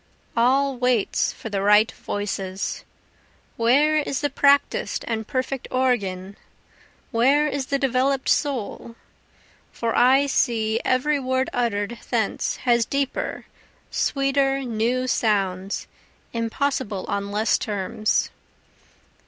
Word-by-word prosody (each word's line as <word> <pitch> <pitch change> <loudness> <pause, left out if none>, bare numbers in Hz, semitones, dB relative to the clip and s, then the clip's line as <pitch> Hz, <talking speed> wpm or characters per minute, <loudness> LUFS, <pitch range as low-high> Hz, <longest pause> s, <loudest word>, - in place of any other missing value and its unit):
All 265 +3 +2
waits 250 -4 +1
for 225 - -8
the 200 -1 -1
right 210 +2 +5
voices; 195 -2 -4 0.7
Where 280 +7 +3
is 285 -2 -1
the 290 -1 -1
practis'd 280 +1 +2
and 220 -2 -3
perfect 260 -1 -3
organ? 200 -7 -1 0.7
where 275 +5 +3
is 280 -3 -3
the 280 - +1
develop'd 270 0 +1
soul? 240 -4 -1 0.8
For 230 -1 -2
I 265 +3 +5
see 225 -5 +1
every 285 +3 +1
word 260 0 -1
utter'd 230 -2 -1
thence - - -1
has 240 -1 +4
deeper, 275 +3 -3 0.5
sweeter, 275 0 +1
new 240 +2 0
sounds, 195 -5 0 0.5
impossible 230 -3 -2
on 200 0 -2
less 210 +2 +1
terms. 210 0 -1
245 Hz, 105 wpm, -23 LUFS, 215-275 Hz, 0.8 s, right